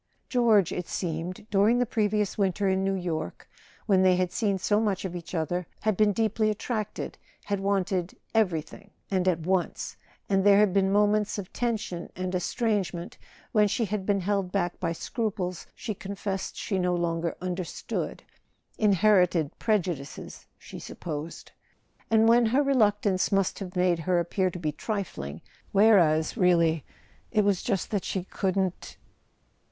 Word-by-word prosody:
George, 225 -7 +4
it 180 - -4
seemed, 175 +4 -4
during 210 +4 +4
the 245 - +2
previous 210 -3 0
winter 200 -1 +1
in 190 0 +1
New 195 0 +1
York, 170 -4 -4 0.4
when 195 -3 +4
they 185 -1 +5
had 180 -1 0
seen 200 -4 0
so 205 +3 +1
much 205 -4 -1
of 180 -1 -4
each 175 +1 -7
other, 170 +2 -1
had 215 -1 +1
been 210 +1 +4
deeply 215 +1 +1
attracted, 215 0 -4 0.3
had 200 -1 -1
wanted 190 -2 -1 0.2
"everything," 195 -2 -1 0.2
and 185 -1 +1
at 170 -3 +2
once—and 190 +2 -2
there 200 0 +6
had 205 -3 +4
been 195 -1 +3
moments 210 +1 +2
of 195 -3 -7
tension 215 -8 -2
and 185 0 -3
estrangement, 185 -2 -1 0.3
when 210 -1 +4
she 225 +3 0
had 205 -1 -3
been 200 0 +1
held 195 -1 -1
back 175 -3 -1
by 165 -2 -1
scruples 185 -1 -3
she 220 - -4
confessed 195 0 -4
she 195 -3 -2
no 180 0 +1
longer 170 -1 -1
understood 180 -1 -4 0.6
(in¬ 210 -3 +4
herited 180 -6 +3
prejudices, 175 - -2
she - - -10
supposed), 155 0 -7 0.6
and 225 0 +5
when 235 0 +5
her 260 +6 +3
re¬ 275 0 +2
luctance 205 -5 +2
must 195 -2 +1
have 190 -2 -7
made 180 -2 +2
her 175 +2 +1
appear 185 +2 0
to 180 - -7
be 155 -3 -2
trifling, 160 - -4 0.3
whereas, 175 -7 +4
really 170 - +3 0.5
it 215 -2 +2
was 200 -3 +2
just 195 -6 -2
that 205 -3 0
she 190 - -2
couldn't. 190 -1 -2
190 Hz, 155 wpm, -27 LUFS, 180-210 Hz, 0.6 s, there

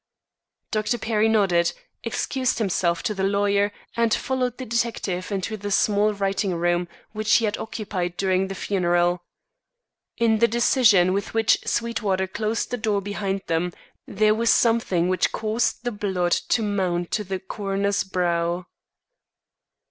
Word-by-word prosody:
Dr. 215 +2 0
Perry 220 -1 +1
nodded, 185 -6 +2 0.3
excused 255 +2 -1
himself 175 -5 0
to 210 - -1
the 195 -1 -3
lawyer 200 +1 +2 0.2
and 230 -1 +2
followed 250 0 -1
the 255 - -6
detective 220 -5 -2
into 200 +2 -2
the 205 0 -5
small 205 +1 +2
writing 195 -2 -1
room 175 +1 0 0.2
which 215 0 +1
he 230 - +3
had 210 0 -1
occupied 190 -5 -4
during 190 0 +1
the 195 - -6
funeral. 175 -2 +1 1.0
In 225 -2 +2
the 235 - +5
decision 225 -6 +4
with 200 +3 -3
which 225 -1 +3
Sweetwater 215 -5 0
closed 215 +4 -2
the 245 - -1
door 215 -3 0
behind 195 -1 -3
them 170 +1 -1 0.3
there 215 +1 +2
was 230 +1 +1
something 225 -7 +3
which 185 -1 +1
caused 220 +2 -1
the 245 - -1
blood 190 -4 -1
to 225 - +1
mount 185 -4 -1
to 210 - 0
the 190 -1 -3
coroner's 200 +1 -1
brow. 175 -2 -1
200 Hz, 145 wpm, -24 LUFS, 185-220 Hz, 1.0 s, the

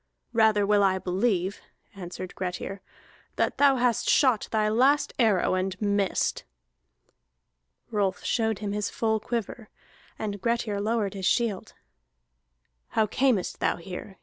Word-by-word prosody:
"Rather 220 -3 +4
will 205 0 +3
I 190 -1 +3
believe," 190 0 -1 0.3
answered 185 -1 -7
Grettir, 185 +1 -5 0.5
"that - - -1
thou 280 -1 +6
hast 245 -2 +1
shot 255 -7 +3
thy 215 -1 +1
last 265 +7 +3
arrow, 215 -8 +3
and 185 0 -2
missed." 200 -2 0 1.5
Rolf 200 -4 -1
showed 220 -3 0
him 205 0 -4
his 205 0 -2
full 220 -1 0
quiver, 225 0 -4 0.5
and 205 -2 -4
Grettir 230 -3 -1
lowered 215 -2 0
his 190 -2 -2
shield. 225 -6 0 1.1
"How 220 - +1
camest 230 -3 0
thou - - +1
here?" 185 +2 -9
210 Hz, 125 wpm, -26 LUFS, 195-230 Hz, 1.5 s, thou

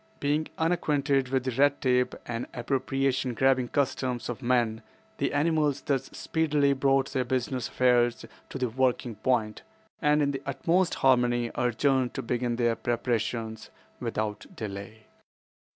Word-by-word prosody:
Being 150 +2 0
unacquainted 145 -5 +1
with 130 -1 0
the 130 - -1
red 140 +3 +3
tape 125 -2 +1
and 115 0 -4
appropriation 130 0 -1
grabbing 130 0 +3
customs 130 -2 -1
of 120 +1 -5
men, 120 -3 +1 0.4
the - - 0
animals 150 -2 +1
thus 135 -3 -1
speedily 150 -3 +1
brought 135 0 +2
their 130 -2 +1
business 125 -1 -2
affairs 120 -1 +2 0.2
to - - -5
the 130 -1 0
working 125 0 0
point, 110 -1 0 0.4
and 150 0 +3
in 140 - +1
the 135 -1 -4
utmost 165 +7 +1
harmony 120 -2 +2
adjourned 125 +2 +1
to 135 - -3
begin 120 0 -1
their 120 -1 +1
preparations 115 -2 -2 0.3
without 105 -1 -3
delay. 105 +1 -7
130 Hz, 135 wpm, -28 LUFS, 120-140 Hz, 0.4 s, red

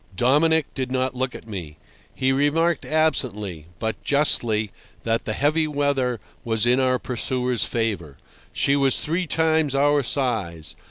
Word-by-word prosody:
Dominic 150 - +3
did 130 -1 -4
not 130 0 0
look 130 0 -3
at - - -10
me. 85 -8 -7 0.4
He 130 0 +1
remarked 155 +5 +1
absently, 105 - -1
but 110 0 -4
justly, 115 -8 +2 0.3
that 115 0 -1
the 110 - -2
heavy 155 +5 +1
weather 140 -5 0 0.2
was 110 -2 0
in 125 +2 +3
our 130 -1 +2
pursuer's 125 -2 -1
favour. 100 - -3 0.3
She 140 - +2
was 135 -2 +3
three 170 +3 -2
times 160 -3 +1
our 145 +1 +3
size. 110 - -2
130 Hz, 145 wpm, -23 LUFS, 110-145 Hz, 0.4 s, Dominic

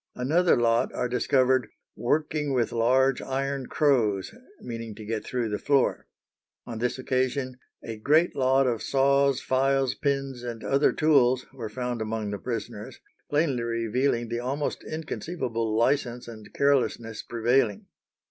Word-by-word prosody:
Another 160 +8 +3
lot 115 -1 +2
are 125 - 0
discovered 125 -1 +2 0.3
"working 150 +2 0
with 120 -3 +1
large 130 +3 +2
iron 135 0 -3
crows," 115 - +1 0.3
meaning 115 -2 -7
to 110 - -10
get 110 0 -3
through 120 -3 -2
the 105 - -2
floor. 140 -3 +1 0.6
On 115 -2 -6
this 125 +2 -1
occasion 130 0 -1 0.2
"a 110 -1 -6
great 155 +9 +3
lot 135 +1 +3
of 120 -3 0
saws, 140 0 +2
files, 135 0 +1
pins, 135 -3 -2
and 120 -2 -6
other 140 +2 +3
tools" 130 -5 +3
were 120 -5 -6
found 125 +1 -4
among 110 -1 -3
the 100 - -4
prisoners, - - -6 0.3
plainly 145 -4 +1
revealing 115 +1 0
the 120 0 -2
almost 135 +4 -3
inconceivable 125 -8 -3
license 120 0 0
and 110 -2 -11
carelessness 125 -5 0
prevailing. 120 -2 +1
125 Hz, 140 wpm, -26 LUFS, 115-135 Hz, 0.6 s, Another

